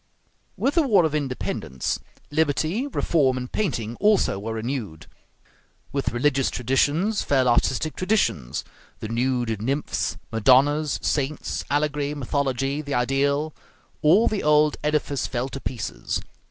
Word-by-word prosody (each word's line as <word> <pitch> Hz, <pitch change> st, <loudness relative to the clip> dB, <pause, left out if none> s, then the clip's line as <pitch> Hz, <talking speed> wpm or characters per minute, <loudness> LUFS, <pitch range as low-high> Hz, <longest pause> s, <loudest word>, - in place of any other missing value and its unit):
With 280 Hz, -, +1 dB
the 335 Hz, -, +4 dB
war 215 Hz, -, +4 dB
of 155 Hz, -, -1 dB
independence, 125 Hz, -, -2 dB, 0.3 s
liberty, 160 Hz, -, +1 dB
reform, 145 Hz, -, +1 dB
and 125 Hz, 0 st, -5 dB
painting 120 Hz, -, -2 dB
also 205 Hz, -, +3 dB
were 110 Hz, +3 st, -4 dB
renewed. 110 Hz, -, -4 dB, 0.9 s
With 140 Hz, -1 st, -1 dB
religious 135 Hz, +2 st, +1 dB
traditions 145 Hz, -, +1 dB
fell 130 Hz, -3 st, +2 dB
artistic 130 Hz, +5 st, +1 dB
traditions; 185 Hz, -, 0 dB, 0.4 s
the 110 Hz, -, -5 dB
nude 120 Hz, -2 st, 0 dB
nymphs, 140 Hz, +6 st, -1 dB
Madonnas, 135 Hz, +6 st, +4 dB
saints, 145 Hz, 0 st, -1 dB
allegory, 145 Hz, 0 st, 0 dB
mythology, 135 Hz, 0 st, -1 dB
the 145 Hz, -2 st, -3 dB
ideal 140 Hz, +4 st, +1 dB, 0.5 s
all 180 Hz, +9 st, +5 dB
the 210 Hz, -, 0 dB
old 150 Hz, 0 st, +4 dB
edifice 150 Hz, -3 st, 0 dB
fell 125 Hz, +1 st, -2 dB
to 135 Hz, -, -6 dB
pieces. 115 Hz, -4 st, -3 dB
140 Hz, 125 wpm, -24 LUFS, 125-150 Hz, 0.9 s, all